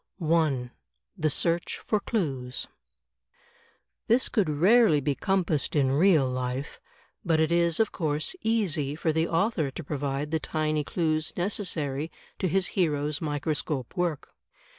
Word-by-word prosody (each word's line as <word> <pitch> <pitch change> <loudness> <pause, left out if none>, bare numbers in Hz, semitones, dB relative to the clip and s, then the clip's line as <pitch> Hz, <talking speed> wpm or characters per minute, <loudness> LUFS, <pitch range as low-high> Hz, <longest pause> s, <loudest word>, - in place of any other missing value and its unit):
I, 155 -7 +1 0.4
The 155 -5 0
Search 170 +4 0
for 215 - -1
Clues 135 - -2 1.4
This 240 +3 +3
could 200 -8 +1
rarely 180 +3 +5
be 145 +1 0
compassed 175 -4 0
in 135 -3 +3
real 155 -1 +4
life, 130 +2 -4 0.4
but 165 -3 +2
it 160 +1 +2
is, 170 -1 +2
of 225 - +2
course, 155 - -1
easy 175 -11 0
for 160 0 0
the 160 +1 +1
author 165 -4 +1
to 150 +5 -7
provide 140 0 -3
the 160 - +1
tiny 155 -1 -1
clues 155 -1 -1
neces 195 +2 -1
sary 145 -1 -2 0.3
to 185 - +1
his 185 +1 +1
hero's 150 -4 0
microscope 145 -3 -2
work. 175 -5 -1
155 Hz, 140 wpm, -27 LUFS, 145-175 Hz, 1.4 s, rarely